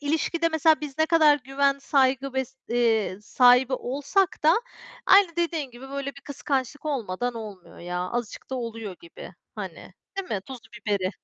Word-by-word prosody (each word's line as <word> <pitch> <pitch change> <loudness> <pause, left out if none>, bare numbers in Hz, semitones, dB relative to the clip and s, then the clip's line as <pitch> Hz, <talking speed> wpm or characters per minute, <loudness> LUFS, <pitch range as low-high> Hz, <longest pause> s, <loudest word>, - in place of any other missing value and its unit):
ilişkide 320 +3 0
mesela 320 -1 +3
biz 295 -1 -7
ne 315 - +4
kadar 315 -3 +5
güven, 275 +1 +1
saygı 270 -1 +1
ve, 265 0 0 0.2
eee, 225 -5 +1
sahibi 250 +3 +5
olsak 285 +9 0
da 315 +2 +6 0.5
aynı 380 -4 +6
dediğin 330 -5 -1
gibi 245 +2 -11
böyle 280 0 -3
bir - - -11
kıskançlık 280 0 -3
olmadan 245 -4 -2
olmuyor 210 -5 -9
ya, 180 +1 -4
azıcık 230 +8 -4
da - - -2
oluyor 225 -6 -5
gibi, 170 - -11 0.2
hani, - - -8 0.2
değil 390 -1 -4
mi? 205 - -2
Tuzu 265 -3 -8 0.3
biberi. 200 -3 0
265 Hz, 160 wpm, -25 LUFS, 230-300 Hz, 0.5 s, da